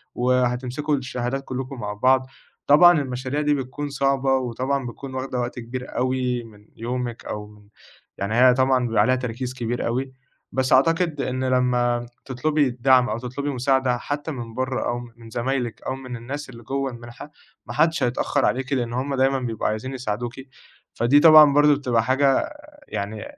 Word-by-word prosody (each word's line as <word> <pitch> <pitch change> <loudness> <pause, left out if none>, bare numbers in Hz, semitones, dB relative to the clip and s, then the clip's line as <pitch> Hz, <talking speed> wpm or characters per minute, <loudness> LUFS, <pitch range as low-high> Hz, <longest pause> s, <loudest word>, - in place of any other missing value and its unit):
وهتمسكوا 125 +3 0
الشهادات 130 0 -3
كلكم 130 0 -5
مع 105 -1 -4
بعض، 130 +4 +2 0.4
طبعًا 170 +2 +7
المشاريع 130 +2 -3
دي 150 0 +2
بتكون 140 +2 -4
صعبة، 135 -1 +1
وطبعًا 130 +2 -2
بتكون 130 +2 -8
واخدة 130 -1 -3
وقت 120 0 -3
كبير 125 +2 -7
أوي 125 -1 0
من 105 -2 -16
يومِك، 120 0 -4
أو 105 0 -7 0.5
يعني 100 +3 -2
هي 125 +1 +6
طبعًا 130 0 +2
بيبقي 115 -1 +2
عليها 130 - +3
تركيز 125 0 -4
كبير 120 -1 -3
أوي، 130 +3 -2 0.4
بس 130 0 +1
أعتقد 165 +2 +2
إن 130 0 -2
لما 125 -2 +1 0.2
تطلبي 145 +3 +1
الدعم 125 0 +3
أو 110 - -2
تطلبي 130 +4 -4
مساعدة 130 -1 +1
حتى 145 +5 -4
من 120 -5 -7
بره 130 +2 -2
أو 120 0 -2 0.2
من 115 -1 -13
زمايلِك، 120 0 -2
أو 130 - -1
من 130 -2 -8
الناس 135 +5 -6
اللي 120 -2 -12
جوَّه 135 +2 -2
المنحة، 120 +4 -11 0.3
ما 120 - -7
حدش 160 +5 +2
هيتأخر 125 +3 0
عليكِ 130 +2 -1
لإن 120 -3 -1
هُم 135 +3 -2
دايمًا 135 +1 +2
بيبقوا 115 -4 -2
عايزين 110 +5 -3
يساعدوكِ، 120 -1 -4 0.6
فدي 120 +5 +4
طبعًا 155 -2 +8
برضو 145 0 +5
بتبقى 125 -5 0
حاجة 135 +2 +2 0.4
يعني 105 +1 -4
130 Hz, 165 wpm, -23 LUFS, 120-135 Hz, 0.6 s, طبعًا